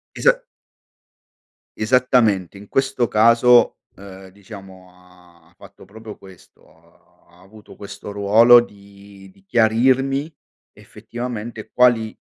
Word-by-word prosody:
Esa - - +1 1.3
Esattamente, 110 -5 0
in 100 - -15
questo 135 -2 -2
caso, 115 +3 +3 0.2
uhm, 95 -1 -14
diciamo 95 -1 -15
ha 90 -2 -24
fatto 100 -1 -18
proprio 110 +2 -13
questo, 95 -3 -19 0.5
ha - - -34 0.2
ha 90 - -23
avuto 105 +3 -18
questo 100 0 -11
ruolo 110 +4 +4
di 100 -3 -13
di 95 0 -27
chiarirmi 130 +7 0 0.4
effettivamente 120 -2 -9
quali 120 -3 +1
105 Hz, 105 wpm, -19 LUFS, 95-120 Hz, 1.3 s, ruolo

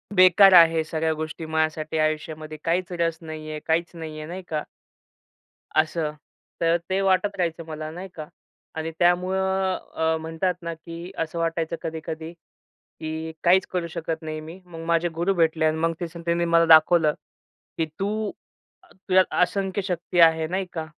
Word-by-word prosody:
बेकार 185 +1 +7
आहे 165 -2 +7
सगळ्या 160 0 -1
गोष्टी 155 +1 -5
माझ्यासाठी 155 0 -1
आयुष्यामध्ये 155 0 -2
काहीचं 175 +1 -1
रस 165 -1 +1
नाही 155 -1 -7
आहे, 155 - -4
काहीचं 165 +1 0
नाही 155 -1 -7
आहे, 155 - -7
नाही 185 +2 -6
का. 155 -1 -2 1.1
असं. 155 -1 +1 0.5
तर 165 +1 +3
ते 190 +1 +1
वाटत 195 +1 +2
राहायचं 165 -2 -1
मला 155 0 -5
नाही 180 +3 -7
का 155 -2 -7 0.5
आणि 160 +1 -3
त्यामुळं 190 +2 +2 0.2
अ, 160 0 +1
म्हणतात 165 +3 -1
ना, 170 0 -4
की 170 +2 -9
असं 165 +1 -3
वाटायचं 165 0 -1
कधी-कधी 160 0 -5 0.5
की 160 0 -7
काहीचं 185 +2 +5
करू 180 -2 -1
शकत 160 0 -4
नाही 155 0 -5
मी. 165 +4 -10
मग 165 -2 -9
माझे 170 +1 +2
गुरु 175 +4 +1
भेटले 160 -2 +2
आणि 155 0 +2
मग 165 +1 +1
त्याच 170 -2 -5
त्यांनी 170 0 +1
मला 170 0 +4
दाखवलं, 160 -1 +6 0.7
की 160 - +1
"तू 210 +2 -1 0.5
अ, - - -22
तुझ्या 190 -1 +3 0.2
असंख्य 190 +2 0
शक्ती 180 -1 -1
आहे," 160 -1 +5
नाही 185 +2 -2
का. 160 -2 -4
165 Hz, 165 wpm, -24 LUFS, 160-180 Hz, 1.1 s, बेकार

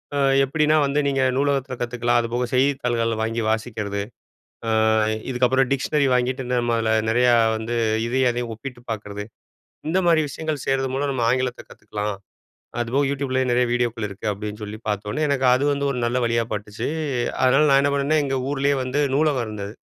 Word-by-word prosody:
ம் 135 -1 +3
எப்டின்னா 150 +3 +2
வந்து 140 +1 0
நீங்க 135 -1 +1
நூலகத்துல 140 -2 0
கத்துக்கலாம் 120 0 +1
அதுபோக 120 +1 -2
செய்தித்தாள்கள் 125 -4 +1
வாங்கி 115 +1 -1
வாசிக்கிறது. 110 -2 -2 0.7
ம். 110 0 +2 0.2
இதுக்கப்புறம் 130 0 +2
டிக்ஷனரி 140 +1 +1
வாங்கிட்டு 125 +1 0
இதுல 125 0 0
நம்ம 120 -1 0 0.3
நெறையா 120 +1 +4 0.2
வந்து 115 +2 -4 0.3
இதையும், 130 +1 +2
அதையும் 120 -1 -4
ஒப்பிட்டு 125 +1 -9
பாக்கறது. 105 -1 -5 0.7
இந்த 180 +4 +2
மாரி 165 -2 +5
விஷயங்கள் 155 -1 -4
செய்றது 135 0 0
மூலம் 140 +1 -1
நம்ம 125 -3 -1
ஆங்கிலத்த 125 -1 -1
கத்துக்கலாம். 105 0 -5 0.7
அதுபோக 125 +4 +1
YouTubeலேயே 130 -2 -1
நெறைய 125 +1 +3
வீடியோக்கள் 120 -2 0
இருக்கு 100 +2 -8
அப்டின்னு 105 +1 -6
சொல்லி 105 +1 -6
பாத்தோனே, 105 +5 -2
எனக்கு 140 -2 0
அது 130 +2 +1
வந்து 140 0 -2
ஒரு 125 - -2
நல்ல 120 +2 0
வழியா 115 0 +1
பட்டுச்சு, 105 +2 -4 0.6
அதனால 135 +4 +5
நான் 135 0 +6
என்ன 140 - +2
பண்ணுனேன் 145 +2 +2
எங்க 135 -1 -1
ஊர்லே 140 0 +1
வந்து 130 +3 -1
நூலகம் 145 -4 +2
இருந்தது. 105 -1 -6
125 Hz, 165 wpm, -22 LUFS, 115-135 Hz, 0.7 s, நான்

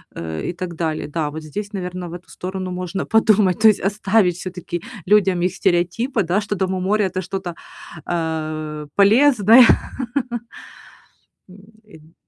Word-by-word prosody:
э, 80 -1 -5
и - - -3
так 175 -1 -6
далее. 160 -1 -2
Да, 150 0 -2
вот 155 +2 -7
здесь, 205 +7 -6
наверное, 180 -2 -5
в - - -9
эту 175 0 -10
сторону 185 0 -5
можно 180 +1 -4
подумать, 215 -4 +3
то 220 - +6
есть 215 -2 +4
оставить 200 -2 +2
всё-таки 180 -1 -6 0.3
людям 190 -3 +3
их 180 +1 +1
стереотипы, 190 +7 0
да, 180 +4 0
что 205 0 -3
дом 190 -1 -1
у 185 - -2
моря- 205 +3 +1
это 185 0 -3
что-то, 185 -1 -5 0.6
э, 155 -2 -3
полезное. 225 +2 +6 1.8
М. 200 -4 -18
185 Hz, 145 wpm, -20 LUFS, 170-205 Hz, 1.8 s, то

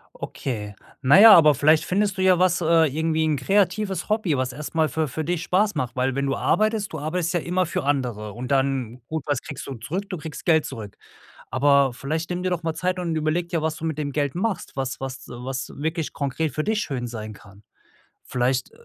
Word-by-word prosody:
Okay. 105 -6 -5 0.3
Na 140 +8 +6
ja, 220 0 +11
aber 155 -3 +7
vielleicht 155 +3 +4
findest 195 +1 0
du 185 - -1
ja 185 -1 +5
was, 180 0 +2
äh, 165 0 +4
irgendwie 160 +2 0
'n 155 -2 +1
kreatives 195 +4 0
Hobby, 210 -8 +1
was 130 0 -1
erst 150 +5 -8
mal 160 -1 +3
für 155 +3 -1
für 155 +5 -4
dich 175 +1 -1
Spaß 205 +4 +1
macht, 125 -1 -3
weil 130 0 0
wenn 140 0 0
du 135 0 0
arbeitest, 215 -1 +1
du 155 - -4
arbeitest 165 +3 -2
ja 175 - +2
immer 180 +3 0
für 155 -4 -3
andere 120 -7 -1
und 125 +3 -6
dann 135 -3 0
gut, 160 -3 -3
was 145 -4 -1
kriegst 145 -5 -8
du 135 - -5
zurück? 180 - -5
Du 185 - -4
kriegst 155 0 -8
Geld 160 -2 +4
zurück. 105 -3 -8 0.5
Aber 140 -2 +3
vielleicht 155 +6 -3
nimm 180 0 -3
dir 185 - 0
doch 175 -2 -2
mal 160 -1 -1
Zeit 185 +2 -1
und 170 -2 -2
überlege 155 +3 0
dir, 165 -2 -1
was 160 0 -1
du 160 - -5
mit 160 -2 -2
dem 145 -2 -2
Geld 145 +1 -1
machst, 195 +2 -2
was 135 -1 -3
was 135 -1 -6
du 120 +1 -9
was 130 -1 -4
wirklich 160 +2 -2
konkret 145 +2 -2
für 155 - -1
dich 215 -1 +1
schön 125 -8 -3
sein 110 -2 -7
kann. 100 0 -17 0.6
Vielleicht, 125 +1 -1
155 Hz, 225 wpm, -24 LUFS, 135-175 Hz, 0.6 s, ja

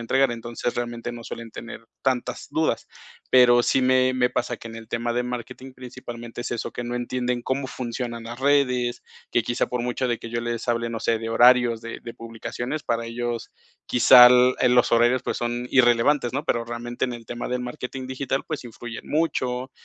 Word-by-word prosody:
entregar. 135 +2 +2
Entonces, 120 +1 -4
realmente 120 0 -4
no 120 -1 -9
suelen 115 -1 -7
tener 115 0 -9 0.2
tantas 130 -2 -1
dudas. - - 0 0.4
Pero 120 -1 +6
sí 135 - +2
me 130 0 +3
me 125 -1 +2
pasa 125 -1 -2
que 115 - -9
en 115 - -9
el 115 -1 -10
tema 120 +1 -2
de 125 - +1
marketing 125 +2 -6
principalmente 120 -2 -8
es - - -5
eso, 115 -2 -3
que 120 - -4
no 120 0 -4
entienden 125 0 -2
cómo 130 +2 -2
funcionan 120 -2 -5
las 120 +1 -7
redes, 125 -3 +1 0.3
que 120 - +2
quizá 120 - -1
por 125 -1 -3
mucho 125 +1 -1
de 120 -2 0
que - - -8
yo 115 0 -3
les 120 0 -4
hable, 115 0 0
no 115 -1 -4
sé, 115 - +1
de 115 0 -5
horarios 120 -1 +5
de 115 0 -7
de 115 - -8
publicaciones, 120 +5 -5
para 115 0 -1
ellos 120 0 -4 0.4
quizá, 125 0 +8 0.3
eh, 125 - +4
los 125 -1 +3
horarios, 120 +2 +4
pues, - - -2
son 120 +1 -2
irrelevantes, 120 +1 +3
¿no? 145 +3 -2
Pero 120 -6 -1
realmente 120 +1 -3
en 125 - -4
el 115 -1 -10
tema 120 +1 -5
del 125 0 -1
marketing 125 +1 -6
digital, 135 +1 -2
pues 155 -4 -4
influyen 120 0 -9
mucho, 130 -5 -1
120 Hz, 200 wpm, -24 LUFS, 115-125 Hz, 0.4 s, quizá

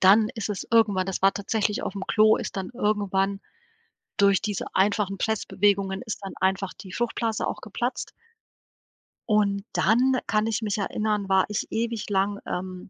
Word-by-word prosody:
dann 210 +3 +6
ist 220 -3 -4
es 205 -3 -4
irgendwann 205 -5 +4
das 190 -1 -3
war 195 0 +5
tatsächlich 210 +1 -1
aufm 195 0 -4
Klo, 215 0 +5
ist - - -5
dann 190 -1 -4
irgendwann 200 -4 0 0.8
durch 200 -1 +4
diese 205 -3 -2
einfachen 195 0 +2
Pressbewegungen 200 -3 +1
ist 220 - -4
dann 195 - -6
einfach 190 0 0
die 190 - -11
Fruchtblase 230 -2 -1
auch - - -4
geplatzt - - -3 1.2
und 200 -2 +2
dann 255 +5 +3
kann 215 0 +1
ich 225 0 -1
mich 210 -1 -1
erinnern, 210 0 -1
war 190 -1 +4
ich 210 - -2
ewig 230 -1 -2
lang, 200 +1 0
ähm, 185 0 -5
205 Hz, 160 wpm, -25 LUFS, 195-215 Hz, 1.2 s, dann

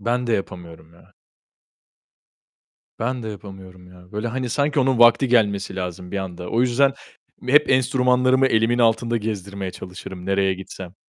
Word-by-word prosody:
Ben 120 +4 -1
de 115 - 0
yapamıyorum 85 -5 -5
ya. 85 - -22 1.9
Ben 125 +2 -2
de 110 - -5
yapamıyorum 95 -3 -11
ya. 90 0 -17
Böyle 105 +3 -3
hani 125 +1 -3
sanki 145 +2 +1
onun 130 -2 +1
vakti 120 +2 +5
gelmesi 105 -5 +1
lazım 90 -1 -5
bir 100 - -1
anda. 90 -2 -6
O 115 - +1
yüzden, 130 +2 +3 0.6
hep 150 +2 +5
enstrümanlarımı 130 0 +3
elimin 115 0 +2
altında 115 0 +2
gezdirmeye 100 -3 -4
çalışırım 90 0 -9
nereye 95 -1 +1
gitsem. 95 -1 -10
110 Hz, 145 wpm, -22 LUFS, 95-125 Hz, 1.9 s, vakti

